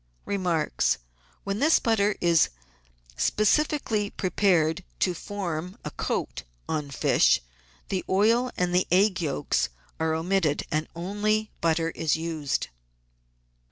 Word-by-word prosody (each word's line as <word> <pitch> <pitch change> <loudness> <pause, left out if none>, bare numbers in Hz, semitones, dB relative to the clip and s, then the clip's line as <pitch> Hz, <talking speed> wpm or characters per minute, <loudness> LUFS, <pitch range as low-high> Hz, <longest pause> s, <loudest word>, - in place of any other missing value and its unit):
Remarks. 175 - 0 0.2
— 60 0 -34
When 200 +1 -2
this 315 +4 +5
butter 210 -3 +2
is 170 -2 +4 0.7
specially 215 -2 +1
prepared 180 -4 +1
to 180 - +1
form 180 -1 -5
a. - - -4
coat - - -3 0.3
on 150 -3 -2
fish, 140 - +3 0.5
the 190 - -1
oil 225 +6 +3
and 180 0 0
the 180 +1 +2
egg 185 +1 +3
yolks 145 -2 0 0.3
are 160 0 +1
omitted 165 -2 +1
and 155 +1 0
only 210 +5 -1
butter 165 0 +1
is 160 -2 0
used. 160 -6 -2
180 Hz, 120 wpm, -26 LUFS, 160-205 Hz, 0.7 s, this